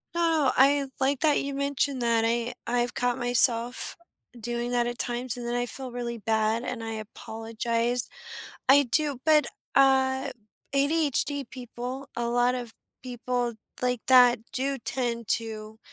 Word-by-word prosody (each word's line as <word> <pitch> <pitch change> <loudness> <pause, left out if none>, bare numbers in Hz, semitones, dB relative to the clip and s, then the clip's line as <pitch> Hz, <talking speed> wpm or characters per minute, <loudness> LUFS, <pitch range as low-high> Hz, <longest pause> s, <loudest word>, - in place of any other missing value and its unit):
Oh, 325 -5 +2
I 275 +1 +4
like 270 0 +1
that 305 -2 +3
you 280 0 -4
mentioned 280 -1 0
that, 230 -1 +2
I 235 +1 0
I've 240 0 0
caught 245 -1 0
myself 245 -1 +2 0.4
doing 240 +1 -3
that 240 -1 +2
at 240 0 -5
times, 245 0 -2
and 240 - -5
then 240 - -1
I 245 0 0
feel 255 +1 -5
really 235 -1 -4
bad, 220 +2 0
and 250 -2 -4
I 225 0 -4
apologize. 230 +2 -3 0.6
I 280 +1 +7
do, 280 +2 0
but, 305 -2 +5 0.3
uh, 265 -1 +3 0.4
ADHD 285 -1 +1
people 250 +2 -7
a 235 0 -1
lot 245 +1 +2
of 240 -3 -5 0.3
people 245 -1 -2 0.3
like 250 -2 0
that 250 -2 +7
do 270 +1 -1
tend 235 -2 -2
to, 220 -1 -2
245 Hz, 145 wpm, -27 LUFS, 235-270 Hz, 0.6 s, I